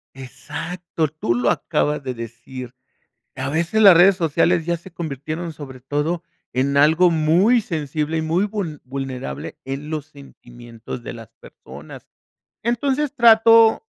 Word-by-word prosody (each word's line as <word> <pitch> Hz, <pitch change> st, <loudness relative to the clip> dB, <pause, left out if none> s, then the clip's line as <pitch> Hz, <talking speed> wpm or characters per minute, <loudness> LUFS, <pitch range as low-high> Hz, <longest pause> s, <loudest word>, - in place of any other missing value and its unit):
Exacto, 145 Hz, +6 st, -5 dB
tú 150 Hz, -5 st, -2 dB
lo 120 Hz, 0 st, +1 dB
acabas 150 Hz, -1 st, -1 dB
de 130 Hz, -1 st, -3 dB
decir. 120 Hz, +2 st, -9 dB, 0.6 s
A 130 Hz, +1 st, -3 dB
veces 170 Hz, +8 st, 0 dB
las 195 Hz, -5 st, +9 dB
redes 185 Hz, +2 st, +6 dB
sociales 165 Hz, 0 st, +1 dB
ya 175 Hz, 0 st, 0 dB
se 170 Hz, +3 st, -14 dB
convirtieron 160 Hz, +2 st, -5 dB
sobre 135 Hz, -4 st, -10 dB
todo 150 Hz, +6 st, -2 dB, 0.3 s
en 135 Hz, +2 st, 0 dB
algo 160 Hz, +5 st, +5 dB
muy 170 Hz, +10 st, +3 dB
sensible 155 Hz, -3 st, -3 dB
y 160 Hz, -, -1 dB
muy 165 Hz, +5 st, +1 dB
vul 190 Hz, -8 st, -5 dB
vulnerable 130 Hz, -, -6 dB
en 135 Hz, +3 st, -6 dB
los 155 Hz, -2 st, -4 dB
sentimientos 120 Hz, -5 st, -11 dB
de -, -, -6 dB
las 115 Hz, -3 st, -12 dB
personas. 70 Hz, +3 st, -13 dB, 0.6 s
Entonces, 265 Hz, +5 st, -1 dB
trato 225 Hz, -, +6 dB
155 Hz, 135 wpm, -21 LUFS, 130-175 Hz, 0.6 s, las